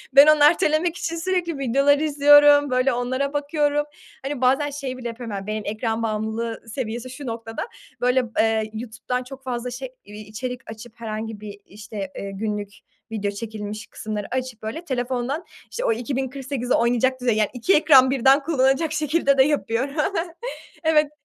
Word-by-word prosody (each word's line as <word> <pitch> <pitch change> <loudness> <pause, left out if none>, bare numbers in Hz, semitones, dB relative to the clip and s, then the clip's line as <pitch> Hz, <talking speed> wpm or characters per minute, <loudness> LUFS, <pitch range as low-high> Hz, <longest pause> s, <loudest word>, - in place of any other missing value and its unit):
ben 280 +2 +10
onu 305 -1 +6
ertelemek 320 +1 +3
için 335 - -3
sürekli 340 -2 -1
videoları 275 +3 +3
izliyorum, 290 -1 +6
böyle 255 +1 +2
onlara 260 +3 -1
bakıyorum. 295 0 0 0.4
Hani 275 -1 -4
bazen 270 +3 +3
şeyi 275 -3 -5
bile 245 -2 -5
yapıyorum, 230 -2 -6
yani 195 0 -6
benim 215 0 -3
ekran 225 +1 -2
bağımlılığı 220 +1 -2
seviyesi 235 +1 -4
şu 265 +3 -9
noktada. 225 - -5 0.3
Böyle, 250 +1 +3
b - - 0
eee, 220 -1 +2
YouTube'dan 235 +2 -4
çok 265 +1 -11
fazla 250 -1 -3
şey 260 +1 -6 0.2
içerik 215 +5 -7
açıp, 220 +1 -11
herhangi 220 -1 -5
bir 205 -1 -9
işte, 200 -1 -7
eee, 200 - -5
günlük 205 0 -3 0.4
video 205 -2 -2
çekilmiş 210 0 -6
kısımları 210 -2 -5
açıp 255 -3 -3
böyle 275 +11 -5
telefondan 260 +4 -2 0.3
işte 210 - -3
o - - +3
2048'i 260 +1 -3
oynayacak 245 +2 +2
düzey, 240 -3 +2
yani 215 -2 +2
2 250 +10 +2
ekran 270 -4 +6
birden 270 +2 +4
kullanacak 275 +1 +2
şekilde 300 -2 +1
de 265 - +7
yapıyorum. 275 -1 -1 0.9
Evet. 305 -2 +3
255 Hz, 160 wpm, -23 LUFS, 225-285 Hz, 0.9 s, ben